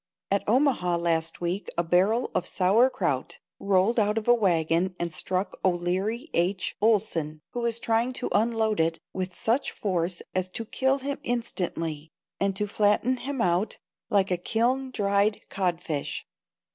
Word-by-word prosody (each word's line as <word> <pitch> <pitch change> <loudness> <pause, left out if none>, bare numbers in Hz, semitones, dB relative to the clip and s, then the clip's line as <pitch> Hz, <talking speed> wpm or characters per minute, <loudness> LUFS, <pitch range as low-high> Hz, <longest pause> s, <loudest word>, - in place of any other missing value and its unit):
At 200 - +2
Omaha 235 -8 +2
last 165 -1 0
week 175 +4 -2
a 170 - +2
barrel 190 +8 +2
of 185 -1 -1
sauer 205 +7 +4
kraut - - -2 0.2
rolled 200 +4 +2
out 210 0 +2
of 225 - -2
a 240 - +7
wagon 180 -4 +1
and 170 -2 -3
struck 185 +4 -2
O'Leary 185 +6 0
H. 185 +2 0
Oleson, 190 -8 +1
who 245 - -3
was 235 -1 0
trying 230 +1 +1
to 250 - -2
unload 220 -1 +1
it, 165 0 +2 0.2
with 185 -1 -4
such 240 +5 +1
force 180 -3 -2
as 185 0 -1
to 225 +5 -5
kill 265 +4 +1
him 280 +1 -4
instantly 165 -10 -3 0.3
and 195 -1 +1
to 210 - 0
flatten 210 +5 +2
him 270 0 -3
out 180 +3 +1 0.3
like 195 -2 +2
a 180 - +2
kiln 245 +8 0
dried 205 -2 +1
codfish. 170 -6 -2
200 Hz, 155 wpm, -27 LUFS, 175-230 Hz, 0.3 s, a